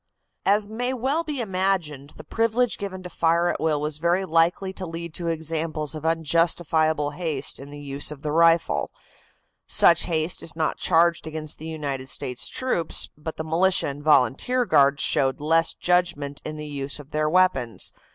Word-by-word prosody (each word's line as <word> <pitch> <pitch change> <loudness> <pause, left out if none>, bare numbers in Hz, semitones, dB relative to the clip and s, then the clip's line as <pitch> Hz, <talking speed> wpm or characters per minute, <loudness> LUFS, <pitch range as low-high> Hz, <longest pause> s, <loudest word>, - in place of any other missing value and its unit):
As 205 +1 +3
may 245 +4 -3
well 270 +7 0
be 295 -5 -3
imagined, 185 - -2
the 155 - -10
privilege 230 +6 0
given 190 -2 -6
to 180 - -7
fire 170 +1 +2
at - - -2
will 155 -2 +1
was 150 0 -3
very 175 +3 +1
likely 175 +3 +1
to 185 -1 -6
lead 165 0 -7
to 170 0 -4
examples 160 -2 -1
of 155 0 -4
unjustifiable 160 -2 +1
haste 155 -3 -3
in 140 +1 -10
the 145 0 -9
use 140 0 -5
of 150 -2 -10
the 150 - -2
rifle. 165 +1 +3 0.8
Such 170 -1 +5
haste 160 0 0
is 160 - -4
not 160 -1 -1
charged 170 -1 +2
against 155 -1 -5
the 160 - -8
United 140 -4 -4
States 125 -3 -2
troops, 250 -11 -1
but 155 +2 -7
the 160 - -3
militia 170 +2 +1
and 140 +1 -7
volunteer 150 - +2
guards 140 -6 +3
showed 135 0 +2
less 165 +2 +2
judgment 175 -6 0
in 155 0 -6
the 150 - -6
use 140 -1 -4
of 145 0 -13
their 155 0 0
weapons. 165 -10 +1
160 Hz, 175 wpm, -24 LUFS, 150-180 Hz, 0.8 s, Such